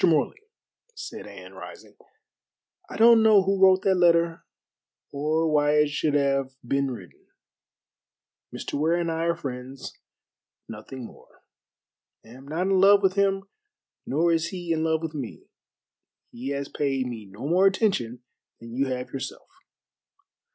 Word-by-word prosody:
Morley," 165 - +1 0.5
said 445 - -8
Anne, - - -12
rising, - - -12 0.9
"I - - -7
don't 230 0 +7
know 215 -3 +6
who 195 0 0
wrote 190 0 +6
that 195 - +3
letter, 170 -2 +3 0.7
or 155 +3 0
why 145 0 +3
it 150 0 +3
should 145 0 -1
have 135 -2 0
been 140 +1 0
written. 100 -9 -10 1.2
Mr. - - -7
Ware 160 +3 +2
and 170 -1 -1
I 165 +1 -2
are 170 0 +1
friends, 130 -4 -7 0.7
nothing 115 +3 -9
more. - - -17 0.8
I - - -16
am 130 +4 -13
not 160 +5 -2
in 190 0 +2
love 200 +1 +6
with 190 -1 +3
him, 195 0 +1 0.6
nor 165 +5 +2
is 165 0 0
he 175 -3 -3
in 160 0 -1
love 160 0 0
with 160 -1 -4
me. 135 -7 -7 0.9
He 125 +3 -6
has 140 0 -3
paid 135 -3 -1
me 115 -4 -7
no 100 +8 -8
more 185 +4 +4
attention 125 - 0 0.4
than 115 0 -11
you 135 +3 0
have 125 -1 -4
yourself." 135 - -6
155 Hz, 150 wpm, -25 LUFS, 135-185 Hz, 1.2 s, don't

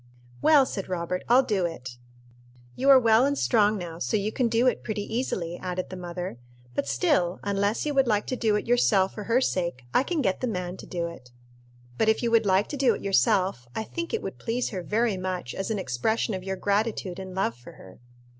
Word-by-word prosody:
"Well," 295 -4 +6
said 195 -7 -5
Robert, 180 0 -2
"I'll 250 +3 +6
do 195 -7 0
it." 125 -7 -8 0.8
"You 270 +2 +1
are 270 - +10
well 225 -1 +4
and 285 +1 +1
strong 215 -4 +3
now, 170 -3 -7
so 125 +8 0
you 205 +1 -1
can 245 +1 +1
do 230 +2 +2
it 255 - +1
pretty 215 -2 -3
easily," 190 -8 -3
added 185 0 -4
the - - -5
mother; 175 -6 -6 0.3
"but - - -2
still, 175 +8 +1
unless 200 +4 0
you 295 - -1
would 270 -2 +3
like 210 -2 +1
to 255 - -2
do 220 -4 +1
it 210 - -1
yourself 215 -5 +3
for 210 - -7
her 235 +2 +3
sake, 170 - -1
I - - +5
can 310 +1 -1
get 190 -3 0
the 255 - 0
man 180 -4 -3
to - - -11
do 175 -2 -3
it. 170 -7 -9 0.7
But 220 - +3
if 220 - +1
you 235 - +1
would 225 -2 +3
like 190 +2 +3
to 290 - -4
do 255 -5 +3
it - - -9
yourself, 185 -6 +2
I 220 - -2
think 335 +9 -5
it 455 - -2
would - - -6
please 240 +2 -2
her 190 -4 -4
very 215 +2 0
much 185 -7 -4
as 195 - -4
an 220 - -1
expression 210 - -1
of 185 -1 -4
your 190 0 -3
gratitude 200 -2 -1
and 190 -1 -8
love 190 -12 0
for 120 +1 -14
her." 95 - -15
200 Hz, 230 wpm, -26 LUFS, 180-230 Hz, 0.8 s, are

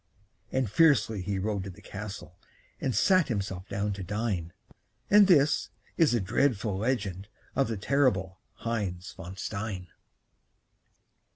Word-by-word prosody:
And 130 -2 +1
fiercely 130 - +3
he 100 +1 -2
rode 100 0 -1
to - - -5
the 95 +2 -12
castle 100 -4 -8 0.4
And 130 -5 -1
sat 185 - +4
himself 95 -5 -3
down 100 +1 -1
to 95 -1 -6
dine; 100 -4 -2 0.6
And 205 -1 +8
this 150 -5 +4 0.3
is 160 -6 +4
the 120 - +3
dreadful 105 0 +1
legend 100 -5 -1 0.3
Of 135 - +2
the 115 - -3
terrible 95 -6 +1 0.3
Heinz 100 -5 -2
von 95 0 -9
Stein. 100 -2 -4
105 Hz, 130 wpm, -29 LUFS, 95-125 Hz, 0.6 s, And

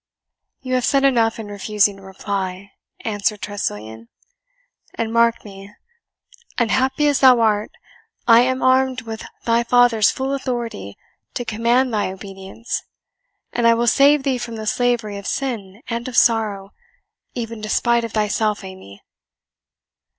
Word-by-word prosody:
"You 255 -1 -4
have 255 -1 +1
said 275 +3 +2
enough 235 -5 +3
in 225 - -6
refusing 205 0 0
to - - -15
reply," 190 0 -5 0.3
answered 210 0 -1
Tressilian; 110 - -5 0.9
"and 225 0 -3
mark 235 -1 +2
me, 200 0 -12 0.8
unhappy 260 +5 +1
as 290 -2 +2
thou 255 -3 +6
art, 215 -2 +1 0.6
I 230 -1 +8
am 255 +1 +1
armed 260 0 +2
with 225 -1 -7 0.2
thy 230 0 +3
father's 240 -3 +4
full 265 +1 -2
authority 240 - -4 0.4
to 245 - -3
command 235 +3 +1
thy 205 -3 0
obedience, 195 +3 -6 0.7
and 235 -1 +2
I 230 - +5
will 235 +1 0
save 280 +3 +4
thee 265 -3 0
from 235 -1 -6
the 220 -1 -6
slavery 230 -3 0
of 200 - -8
sin 225 -5 -4
and 235 +1 -4
of 250 - -4
sorrow, 210 -4 +2 0.6
even 230 -2 -5
despite 235 +2 +1
of 230 - -6
thyself, 210 0 0
Amy." 185 - -12
225 Hz, 140 wpm, -20 LUFS, 205-245 Hz, 0.9 s, I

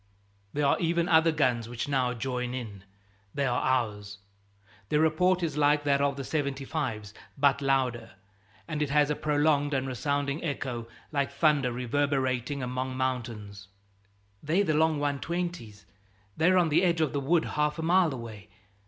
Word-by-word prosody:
There 145 0 0
are 140 - +3
even 170 0 +1
other 160 0 +5
guns 125 -7 0
which 120 +3 -4
now 130 -3 0
join 125 +1 -3
in 105 -6 -7 0.5
they 140 -1 0
are 125 -1 0
ours. 105 -6 -1 0.7
Their 150 - +2
report 175 +3 +2
is 155 -3 -2
like 145 0 +3
that 140 -1 +2
of 140 -1 +1
the 135 - -5
75's, 135 -7 -3 0.2
but 140 0 +3
louder, 130 -5 0 0.5
and 150 -1 -3
it 150 - 0
has 150 +1 +3
a - - 0
prolonged 145 -1 +1
and 135 0 0
resounding 140 +3 -2
echo, 130 -6 -3 0.2
like 140 -2 0
thunder 140 -3 +2
reverberating 130 +1 -1
among 130 +1 -3
mountains. 115 -6 -4 0.7
"They're 165 +7 +1
the 155 - 0
long 160 0 +2
120's. 145 - -3 0.5
They're 180 +4 +3
on 175 -3 +3
the 160 +3 +3
edge 170 -3 +2
of 155 - 0
the 140 - 0
wood 160 +4 +2
half 150 +1 -1
a 160 - -4
mile 175 0 +3
away. 110 -5 -8
140 Hz, 160 wpm, -28 LUFS, 125-155 Hz, 0.7 s, other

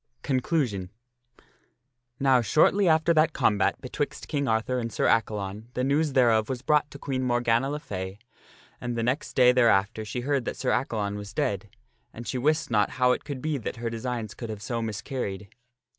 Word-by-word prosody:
CONCLUSION 130 - 0 1.3
Now 135 -2 +4
shortly 160 - +3
after 160 +1 +4
that 155 0 +3
combat 105 -6 +2
betwixt - - -4
King 140 -2 -1
Arthur 115 +3 0
and 115 -1 -3
Sir - - 0
Accalon 105 -1 0
the 125 - 0
news 145 +2 +1
thereof 115 -4 +3
was 130 -1 -4
brought 150 +1 +2
to - - -10
Queen 135 -2 -3
Morgana 120 0 +1
le 150 +1 -3
Fay, 95 -6 -6 0.6
and 120 -1 -3
the 115 - 0
next 130 +5 -1
day 125 -1 +6
thereafter 110 -3 +3
she 120 +3 -4
heard 140 0 0
that - - -4
Sir - - 0
Accalon 105 -4 -1
was 100 0 -8
dead, 100 0 -1 0.5
and 120 +1 -8
she 130 - -2
wist 155 +2 +1
not 105 -2 +3
how 125 -1 +4
it - - -1
could 135 -3 -6
be 155 -2 -1
that 115 - -5
her 115 -1 -4
designs 115 -2 -4
could 115 - -7
have 105 -2 -6
so 120 0 -2
miscarried. 105 -3 -4
120 Hz, 185 wpm, -27 LUFS, 110-135 Hz, 1.3 s, day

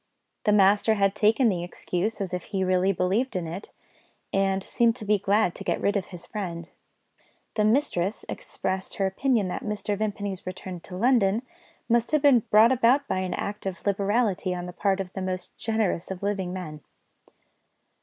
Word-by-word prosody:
The 210 - +4
master 205 +2 +4
had 195 -1 +2
taken 220 +4 +3
the 180 -5 0
excuse 180 +4 -3
as 185 -2 -3
if 180 - -3
he 190 -1 -2
really 185 +1 +2
believed 195 +8 0
in 180 -2 -1
it, 175 +5 -7 0.6
and 195 0 +1
seemed 230 +1 +2
to 220 - -6
be 210 0 +3
glad 200 -1 +2
to - - -8
get - - -1
rid 205 - +1
of 195 -3 -1
his 175 -2 -10
friend. 170 -5 -5 0.9
The 215 - +1
mistress 215 -5 +1
expressed 190 0 -4
her 195 - 0
opinion 215 +2 +1
that - - -4
Mr. 210 -1 -2
Vimpany's 205 -3 -3
return 185 0 -6
to 180 +2 -9
London 230 -1 +3 0.4
must 235 +3 +1
have 305 -2 +3
been 280 -4 +7
brought 220 +3 +6
about 260 +3 +3
by 185 - 0
an 185 -1 -2
act 205 -1 -4
of 190 -1 -6
liberality 200 -2 +1
on 175 0 -5
the 180 - -7
part 195 +1 0
of 190 -1 -5
the 190 - -4
most 185 -1 -4
generous 220 -6 -1
of 190 0 -6
living 195 -3 -1
men. 160 -5 -6
195 Hz, 185 wpm, -26 LUFS, 185-215 Hz, 0.9 s, been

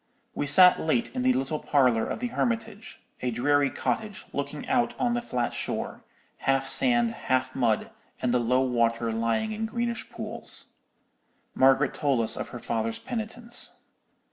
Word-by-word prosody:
We 145 - -2
sat 180 +5 +7
late 195 +9 0
in 255 - -2
the 255 0 +4
little 145 - -1
parlour 125 -6 +2
of - - -4
the 245 - -1
Hermitage; 225 -3 -3 0.2
a 125 - 0
dreary 140 +4 +2
cottage, 210 +6 -3
looking 140 +1 -4
out 245 -2 +1
on 245 -1 +1
the 240 - 0
flat 125 - -2
shore, - - -4 0.3
half 135 0 +1
sand, 240 - +3
half 130 - -1
mud, 115 -5 +1 0.3
and 125 -1 0
the 125 - +3
low 125 +2 +2
water 115 -2 +1
lying 115 - 0
in 220 +1 -3
greenish 235 +1 -3
pools. - - -6 0.8
Margaret 135 +1 +4
told 140 -5 +1
us 115 0 +2
of - - -4
her - - -7
father's 115 -1 -2
penitence. 235 0 -1
145 Hz, 160 wpm, -27 LUFS, -, 0.8 s, sat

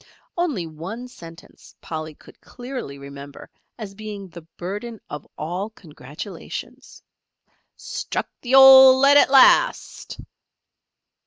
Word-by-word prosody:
Only 305 - -2
one 170 +10 -9
sentence 170 -7 -16
Polly 155 -1 -7
could - - -20
clearly 245 - -9
remember 140 0 -12 0.3
as 210 -4 -9
being 205 -1 -9
the 170 0 -12 0.2
burden 205 +5 -7
of 145 -1 -8
all 180 +7 -5
congratulations. 170 - -11 0.7
"Struck - - -5
the 255 +1 0
old 265 -1 +8
lead 280 +1 +5
at - - +4
last!" 275 - +2
200 Hz, 105 wpm, -21 LUFS, 160-255 Hz, 0.7 s, old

